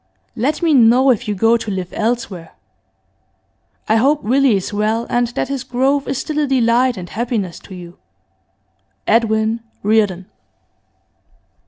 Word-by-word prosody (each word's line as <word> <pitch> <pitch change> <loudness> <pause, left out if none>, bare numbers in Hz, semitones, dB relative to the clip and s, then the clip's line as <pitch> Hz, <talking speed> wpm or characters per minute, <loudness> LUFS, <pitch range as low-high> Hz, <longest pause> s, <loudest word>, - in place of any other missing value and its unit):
Let 280 +8 -1
me 325 -2 +3
know 255 +1 +5
if 230 - -2
you 210 - -1
go 225 +4 +3
to 225 - -6
live 185 -3 -4
elsewhere. 220 -7 -3 1.3
I 220 - +3
hope 280 +6 +2
Willie 260 +1 +3
is 195 +2 -3
well, 215 +3 0
and 240 0 +1
that 240 - -3
his 275 -2 -4
growth 265 +3 0
is 270 - -2
still 305 +3 -3
a 295 - +1
delight 250 -1 +2
and 180 -1 -7
happiness 215 -4 -3
to 190 - -12
you. 175 -1 -12 1.1
'EDWIN 220 0 +1 0.2
REARDON. 205 -4 +1
230 Hz, 145 wpm, -18 LUFS, 210-260 Hz, 1.3 s, know